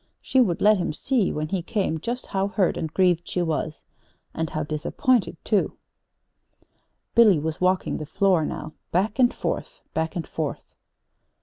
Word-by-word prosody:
She 260 Hz, -, +2 dB
would 180 Hz, -9 st, +1 dB
let 210 Hz, -1 st, +6 dB
him 175 Hz, -, -1 dB
see, 230 Hz, -, +1 dB
when 155 Hz, 0 st, -3 dB
he 190 Hz, 0 st, -1 dB
came, 185 Hz, -4 st, -1 dB
just 240 Hz, +9 st, -4 dB
how 195 Hz, 0 st, -1 dB
hurt 200 Hz, -3 st, +1 dB
and 160 Hz, -2 st, -3 dB
grieved 175 Hz, -1 st, +2 dB
she 180 Hz, -, -1 dB
was 155 Hz, -1 st, -3 dB, 0.5 s
and 160 Hz, -1 st, -2 dB
how 155 Hz, -, -2 dB
disappointed, 175 Hz, -, 0 dB
too. 210 Hz, -3 st, +1 dB, 1.4 s
Billy 220 Hz, -6 st, +6 dB
was 155 Hz, +2 st, -3 dB
walking 185 Hz, 0 st, +1 dB
the 155 Hz, -, -5 dB
floor 190 Hz, -3 st, +2 dB
now, 155 Hz, +1 st, -5 dB, 0.2 s
back 205 Hz, +6 st, 0 dB
and 245 Hz, -1 st, +5 dB
forth, -, -, -4 dB
back 160 Hz, 0 st, -1 dB
and 170 Hz, -, -3 dB
forth. 155 Hz, -3 st, -5 dB
180 Hz, 165 wpm, -25 LUFS, 160-210 Hz, 1.4 s, let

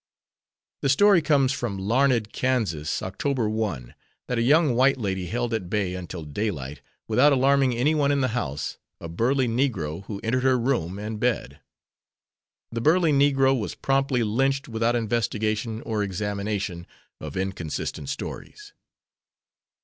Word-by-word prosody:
The 140 Hz, -, +1 dB
story 195 Hz, +5 st, +5 dB
comes 140 Hz, -3 st, +3 dB
from 120 Hz, -7 st, -3 dB
Larned, 115 Hz, +2 st, +1 dB
Kansas, 110 Hz, -13 st, -1 dB
Oct. 115 Hz, +5 st, -1 dB
1, 95 Hz, -, -3 dB, 0.3 s
that 125 Hz, -2 st, -1 dB
a -, -, +2 dB
young 145 Hz, +3 st, +4 dB
white 130 Hz, +3 st, +3 dB
lady 95 Hz, -5 st, -2 dB
held 120 Hz, +4 st, -2 dB
at 100 Hz, -6 st, -3 dB
bay 100 Hz, -3 st, -1 dB
until 90 Hz, -2 st, -6 dB
daylight, 75 Hz, -4 st, -4 dB, 0.3 s
without 125 Hz, +7 st, +4 dB
alarming 135 Hz, -1 st, +3 dB
any 135 Hz, +7 st, +2 dB
one 145 Hz, -2 st, +2 dB
in 140 Hz, -1 st, +1 dB
the 130 Hz, -, +1 dB
house, 75 Hz, -, -3 dB, 0.2 s
"a 85 Hz, -, -7 dB
burly 125 Hz, +10 st, +1 dB
Negro" 110 Hz, -, -1 dB
who 100 Hz, -2 st, -6 dB
entered 120 Hz, +3 st, 0 dB
her 130 Hz, 0 st, +3 dB
room 115 Hz, -8 st, -1 dB
and 105 Hz, +1 st, -5 dB
bed. 110 Hz, -, -1 dB, 1.1 s
The 115 Hz, 0 st, -3 dB
"burly 165 Hz, +3 st, +4 dB
Negro" 135 Hz, -1 st, +4 dB
was 110 Hz, -5 st, -3 dB
promptly 135 Hz, -3 st, +1 dB
lynched 135 Hz, +6 st, 0 dB
without 115 Hz, +1 st, 0 dB
investigation 110 Hz, -1 st, -1 dB
or 110 Hz, -2 st, -2 dB
examination 100 Hz, -2 st, -3 dB, 0.3 s
of 75 Hz, +1 st, -7 dB
inconsistant 95 Hz, -, -4 dB
stories. 410 Hz, -, -7 dB
115 Hz, 140 wpm, -25 LUFS, 100-135 Hz, 1.1 s, story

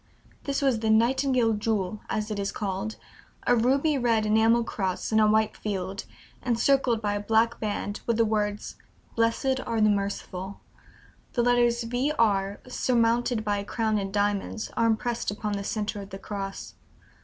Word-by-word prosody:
This 280 Hz, 0 st, -1 dB
was 260 Hz, -5 st, +2 dB
"the 220 Hz, 0 st, -1 dB
Nightingale 245 Hz, +1 st, +3 dB
Jewel," 210 Hz, -2 st, -1 dB
as 215 Hz, 0 st, -2 dB
it 205 Hz, -, -3 dB
is 200 Hz, 0 st, -1 dB
called; 200 Hz, +2 st, -3 dB, 0.5 s
"a 245 Hz, -, +4 dB
ruby 270 Hz, +5 st, +2 dB
red 230 Hz, -3 st, +2 dB
enamel 225 Hz, +2 st, +4 dB
cross 190 Hz, -1 st, -3 dB
on 220 Hz, -, +5 dB
a 215 Hz, -, +5 dB
white 215 Hz, 0 st, +2 dB
field, 195 Hz, -2 st, -4 dB, 0.4 s
encircled 245 Hz, -1 st, +2 dB
by 205 Hz, -1 st, 0 dB
a 205 Hz, -, -1 dB
black 225 Hz, +3 st, +2 dB
band 205 Hz, -1 st, -3 dB
with 235 Hz, -2 st, +1 dB
the 230 Hz, -, +4 dB
words: 210 Hz, -1 st, -2 dB, 0.4 s
'Blessed 230 Hz, +3 st, +1 dB
are 230 Hz, -, -2 dB
the 215 Hz, -1 st, +5 dB
merciful.' 200 Hz, -1 st, -3 dB, 0.7 s
The 240 Hz, -, +1 dB
letters 240 Hz, -1 st, +3 dB
V. 245 Hz, +5 st, 0 dB
R.; 200 Hz, -3 st, +1 dB
surmounted 240 Hz, -2 st, +1 dB
by 205 Hz, -1 st, 0 dB
a -, -, -4 dB
crown 220 Hz, 0 st, 0 dB
in 195 Hz, -1 st, -4 dB
diamonds, 205 Hz, +1 st, -1 dB
are 230 Hz, -, +2 dB
impressed 230 Hz, +1 st, 0 dB
upon 210 Hz, +1 st, -3 dB
the 200 Hz, 0 st, -3 dB
centre 210 Hz, 0 st, -3 dB
of 195 Hz, -, -10 dB
the 195 Hz, -, -7 dB
cross. 195 Hz, 0 st, -6 dB
220 Hz, 165 wpm, -27 LUFS, 205-235 Hz, 0.7 s, on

